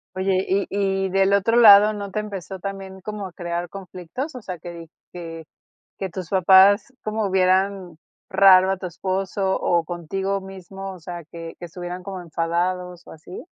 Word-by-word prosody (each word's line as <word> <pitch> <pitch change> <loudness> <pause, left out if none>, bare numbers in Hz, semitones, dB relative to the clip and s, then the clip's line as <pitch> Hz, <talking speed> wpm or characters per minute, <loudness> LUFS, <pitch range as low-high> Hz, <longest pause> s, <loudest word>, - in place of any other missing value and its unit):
Oye, 190 0 0
y 195 +1 +1 0.4
y - - -2
del 195 +1 +2
otro 225 +4 +3
lado, 210 -2 +8
¿no 200 -2 -6
te 215 - -2
empezó 195 -2 -6
también 195 -1 -7
como 210 -1 -5
a 180 - -14
crear 175 0 -4
conflictos? 195 - -7
O 250 - -7
sea, 185 -3 -6
que 175 +2 -9
di 165 -1 -10 0.2
que 165 -2 -8 0.5
que 190 -1 -3
tus 180 0 -7
papás 195 +6 +5
como 215 -2 -2
vieran 185 -2 +1 0.3
raro 190 0 +6
a 195 - -1
tu 185 - -7
esposo 190 +2 -2
o 170 -1 +1
contigo 190 +4 -3
mismo, 195 0 -9
o 180 - -12
sea, 170 +1 -8
que 165 -1 -8
que 175 - -7
estuvieran 180 +1 -7
como 190 -2 -6
enfadados, 175 +2 -2
¿o - - -11
así? 175 - -11
190 Hz, 175 wpm, -22 LUFS, 175-195 Hz, 0.5 s, lado